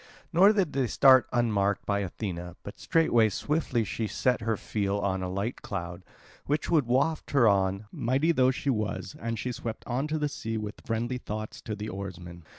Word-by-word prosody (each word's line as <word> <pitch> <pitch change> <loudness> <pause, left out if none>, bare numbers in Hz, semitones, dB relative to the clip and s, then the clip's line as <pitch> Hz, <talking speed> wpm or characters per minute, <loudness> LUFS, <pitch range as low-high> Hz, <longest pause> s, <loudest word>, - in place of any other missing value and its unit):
Nor 190 +5 +7
did 195 -8 0
they 135 -2 +1
start 130 +2 +6
unmarked 105 -5 +1
by 100 -1 +1
Athena, 90 -3 -5
but 100 - -9
straightway 120 -9 +3
swiftly 135 - 0
she 110 +1 -3
set 125 +2 0
her 110 -1 0
feel 100 -1 -1
on 95 -2 -1
a 90 - -3
light 100 +6 -3
cloud, 90 -2 -5 0.4
which 150 +3 -1
would 150 -7 +3
waft 140 +6 +1
her 130 -5 +5
on, 100 0 +2
mighty 135 +7 +1
though 130 -5 +4
she 135 +2 0
was, 105 -4 -3
and 115 0 -3
she 125 +3 -3
swept 115 -2 -6
on 130 +4 -1
to 155 +1 -1
the 150 -1 0
sea 115 -5 -4
with 105 -1 -6
friendly 120 +2 -2
thoughts 110 -1 -6
to 110 - -4
the 105 +1 -5
oarsmen. 90 -3 -7
110 Hz, 190 wpm, -28 LUFS, 100-130 Hz, 0.4 s, Nor